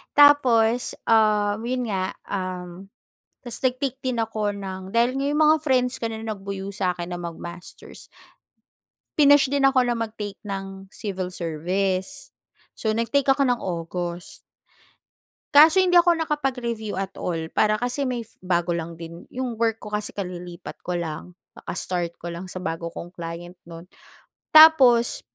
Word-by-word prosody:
tapos, 250 -5 +5
um, 210 -2 +3
yun 250 0 -1
nga, 185 -1 -2
um, 185 -1 -5 0.5
tapos 240 -2 -7
nag-take 260 +1 0
din 255 -2 -1
ako 215 -2 -1
ng 190 -1 -7
dahil 240 +3 +2
nga 275 +1 -1
'yung 300 - 0
mga 310 0 +6
friends 255 -3 +2
ko - - -6
na 220 0 -6
nagbuyo 200 -3 -5
sa 185 -2 0
akin 175 0 -6
na - - -5
mag-masters. 170 +1 -9 1.1
Pinush 285 -2 +6
din 280 -1 +3
ako 265 -1 +4
na 240 - +1
mag-take 215 -3 -5
ng 195 -1 -6
Civil 185 -3 -4
Service. 185 - -2 0.5
So, 220 - 0
nag-take 230 +5 0
ako 270 +1 +3
ng 245 -1 +1
August. 175 -1 -5 1.1
Kaso 310 +5 +8
hindi 355 -1 +6
ako 345 -1 +3
nakapag-review 250 -8 -2
at 195 0 -3
all, 165 -2 -3
para 215 0 +3
Kasi 245 +4 -2
may 245 -2 -3 0.2
bago 175 -1 0
lang 170 0 -4
din 165 +1 -10
yong 245 -3 -5
work 225 -1 +1
ko 210 - -9
kasi 210 0 -2
kalilipat 180 -3 -7
ko 180 - -3
lang. 170 +1 -6 0.2
Kaka-start 175 -2 -4
ko 170 0 -7
lang 175 +2 -7
sa 180 - -9
bago 170 -2 -3
kong 170 +1 -9
client 175 +1 -8
no'n. 165 0 -10 0.7
Tapos 310 - +7
205 Hz, 150 wpm, -24 LUFS, 180-250 Hz, 1.1 s, Kaso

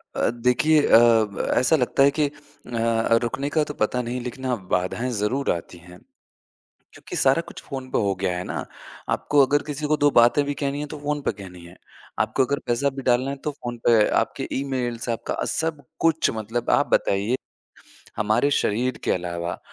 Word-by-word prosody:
अ, - - +1
देखिए 125 +6 +3
अ, - - +7
ब 115 -3 +3
ऐसा 130 +6 +4
लगता 135 -1 +2
है 140 - +5
कि 150 - +3
अ 145 -4 -11
अ, 115 0 +2
रुकने 135 +4 -2
का 155 0 +1
तो 150 - -6
पता 125 0 0
नहीं 125 +1 -4
लेक़िन 125 +2 -7
ना 125 - +1 0.2
बाधाएँ 95 +8 -2
ज़रूर 130 +7 0
आती 85 +1 -5
हैं। 90 +1 -15 0.9
क्योंकि - - -9
सारा 135 +5 +3
कुछ - - -10
फ़ोन 135 -2 -7
पे - - +1
हो 100 -2 +1
गया 90 -2 0
है 90 - -3
ना। - - -4 0.4
आपको 145 -2 +3
अगर 145 +2 +1
किसी 150 0 -4
को 155 - +2
2 145 0 +4
बातें 120 +4 +5
भी 145 - -2
कहनी 140 0 -1
हैं 150 - -4
तो - - -6
फ़ोन 145 0 -2
पे - - 0
कहनी 90 -3 -11
है। 85 - -14 0.4
आपको 130 - +2
अगर 140 +3 -1
पैसा 120 +4 +1
भी 135 - -5
डालना 130 +1 +2
है - - -4
तो 150 - -1
फ़ोन 120 -4 -7
पे 115 -3 +5
आपके - - -4
ईमेल्स 125 -4 -3
से 120 - -1
आपका 115 - -3
सब 160 -3 -2 0.2
कुछ 160 -1 +2
मतलब 115 +2 -3
आप - - +1
बताइए 100 +5 +2 0.8
हमारे 110 +7 +2
शरीर 125 -1 0
के - - 0
अलावा 85 -1 -3
125 Hz, 200 wpm, -23 LUFS, 110-140 Hz, 0.9 s, अ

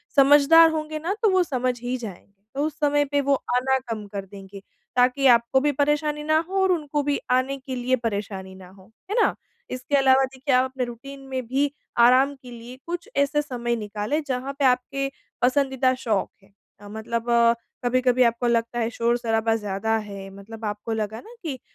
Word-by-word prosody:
समझदार 290 +4 +7
होंगे 310 -1 -3
ना, 340 +5 -2
तो 435 - +5
वो 375 -1 +3
समझ 255 -5 -2
ही 245 +1 -2
जाएँगे। 200 -3 -11
तो 285 +2 0
उस 310 -1 -5
समय 290 0 +2
पे 285 0 0
वो 280 0 +2 0.2
आना 265 +1 +2
कम 220 -2 -4
कर 200 -1 -6
देंगे, 195 0 -11 0.3
ताकि 250 +2 +3
आपको 235 +1 +4
भी 295 +1 +2
परेशानी 295 +1 0
ना 310 +1 +2
हो 385 0 0
और 380 - +3
उनको 295 -4 -1
भी 285 0 0
आने 255 +2 +1
के 260 -1 -7
लिए 250 +1 +1
परेशानी 195 -3 -5
ना 185 -1 -13
हो। 190 +2 -19 0.2
है - - 0
ना? - - +2 0.3
इसके 255 +3 -2
अलावा, 265 0 +5
देखिए, 265 +1 -3
आप 255 +1 +4
अपने 260 -1 -3
रूटीन 260 +4 -9
में 260 -2 -4
भी 275 +3 0 0.3
आराम 255 +4 +5
के 255 -2 -14
लिए 240 +2 -10
कुछ 345 0 -5
ऐसे 280 +1 +2
समय 240 -4 -3
निकालें, 215 +6 -3
जहाँ 260 +1 -3
पे 280 - +2
आपके 260 +2 +1 0.3
पसंदीदा 265 0 +2
शौक 225 -6 -1
हैं। 195 0 -25 0.3
अ, 205 - -12
मतलब 220 +2 -4 0.6
कभी-कभी 250 0 +3
आपको 235 +1 +1
लगता 235 0 0
है, 225 -1 0
शोर-शराबा 230 -1 0
ज़्यादा 210 +1 -1
है, 200 -2 -7
मतलब 220 +3 -9
आपको 210 +2 -4
लगा 220 0 -3
ना 455 - -14
कि 280 -6 -4
255 Hz, 190 wpm, -24 LUFS, 225-280 Hz, 0.6 s, समझदार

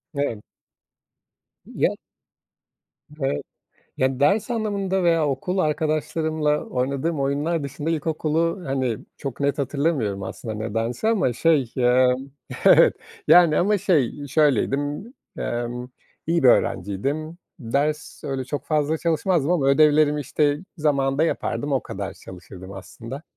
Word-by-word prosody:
Evet. 130 -7 -2 1.2
Ya - - 0 1.3
Evet, 75 - -1 0.5
yani 130 0 0
ders 200 +11 +2
anlamında 200 -4 -1
veya 165 -3 +3
okul 160 +8 -2
arkadaşlarımla 155 -1 0
oynadığım 140 +5 -2
oyunlar 145 +4 0
dışında 145 +3 -4
ilkokulu, 165 +3 -1
hani, 130 -4 -1 0.2
çok 135 -2 -6
net 140 0 0
hatırlamıyorum 140 -8 -1
aslında 110 +3 -6
nedense 115 - -2
ama 205 - +2
şey, 140 -2 +2
ımm, 125 +1 +2 0.3
evet, - - +7 0.3
yani 170 -4 +7
ama 205 +3 +2
şey, 145 - 0
şöyleydim, 145 - 0 0.2
emm 120 +1 -3 0.4
iyi 165 -1 +1
bir 130 - +6
öğrenciydim. 140 - 0 0.2
Ders... 145 +4 -2
Öyle 135 -1 -3
çok 140 +3 -4
fazla 155 0 +1
çalışmazdım 170 -2 +1
ama 155 -6 +1
ödevlerimi, 150 +1 +4
işte, 145 +1 +1 0.2
zamanında 140 -1 +1
yapardım, 145 -3 -2
o 135 - +1
kadar 95 0 -5
çalışırdım 95 +1 -11
aslında. 110 - -9
145 Hz, 115 wpm, -23 LUFS, 130-160 Hz, 1.3 s, evet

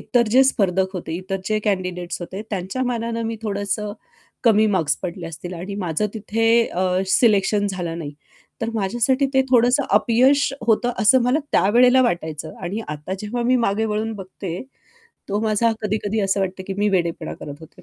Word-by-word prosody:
इतर 240 -2 +1
जे 260 +3 +6
स्पर्धक 190 -6 +1
होते, 165 -3 -5
इतर 190 +1 -4
जे 215 0 +1
कँडिडेट्स 180 -3 -2
होते, 190 +4 -6
त्यांच्या 195 +5 -3
मानानं 230 -1 -2
मी 225 0 -3
थोडंसं 205 0 -2 0.5
कमी 220 -1 +5
मार्क्स 160 -6 +1
पडले 175 -1 -5
असतील 175 +2 -7
आणि 185 +4 -6
माझं 185 0 -1
तिथे 225 +1 -1 0.2
अ, 185 +1 -1 0.2
सिलेक्शन 205 0 +3
झालं 170 -3 -4
नाही. 150 -3 -6 0.5
तर 225 0 -1
माझ्यासाठी 240 +7 +1
ते 265 - +5
थोडंसं 245 +3 +4
अपयश 255 +7 +3
होतं, 235 +2 +3
असं 235 +4 +5
मला 250 +5 +2
त्यावेळेला 250 +5 +5
वाटायचं. 160 -8 -2
आणि 195 +6 -3
आता 150 +5 -5
जेव्हा 235 +3 -3
मी 255 +2 +3
मागे 220 -2 +1
वळून 220 +1 -2
बघते, 185 -2 -6 0.7
तो 205 +1 0
माझा 220 +1 +2
कधी-कधी 210 0 -1
असं 195 0 +1
वाटते 190 0 -3
की 195 +1 -5
मी 210 0 +2
वेडेपणा 170 -4 -1
करत 145 - -7
होते. 160 +3 -15
205 Hz, 170 wpm, -21 LUFS, 185-230 Hz, 0.7 s, जे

